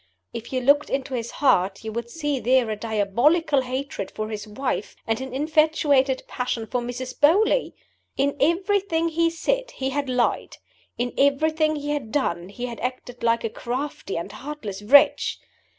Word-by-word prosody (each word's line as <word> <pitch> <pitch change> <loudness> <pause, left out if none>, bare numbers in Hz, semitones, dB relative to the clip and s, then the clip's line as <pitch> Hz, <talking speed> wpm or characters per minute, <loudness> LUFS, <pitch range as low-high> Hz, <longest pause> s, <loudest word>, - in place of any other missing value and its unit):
If 230 0 -7
you 255 -1 -1
looked 285 +3 +3
into 270 0 -2
his 235 -2 -3
heart, 195 -9 +2
you 220 - -4
would 235 +1 -4
see 295 -2 -2
there 250 -1 +2
a - - -1
diabolical 235 - +2
hatred 260 -4 -4
for 215 0 -5
his 215 0 -6
wife 250 +5 -3
and 225 +1 -1
an 265 -1 -6
infatuated 290 -2 +2
passion 245 -3 -3
for 245 +2 -2
Mrs. 250 +1 -6
Beauly! 390 +11 +4 0.4
In 280 +1 +1
everything 340 0 +1
he 335 +1 +1
had 330 - +1
said - - -1
he 265 0 -2
had 280 -1 -2
lied; 250 -1 0 0.4
in 245 +1 -2
everything 310 +3 +2
he 290 0 -3
had 275 -7 -3
done 175 -11 -1
he 245 +5 -5
had 235 -2 -6
acted 250 0 -5
like 230 0 +2
a 225 - -1
crafty 255 -4 -4
and 170 +4 -5
heartless 245 -7 -7
wretch! 275 +7 +5
260 Hz, 170 wpm, -24 LUFS, 235-295 Hz, 0.4 s, wretch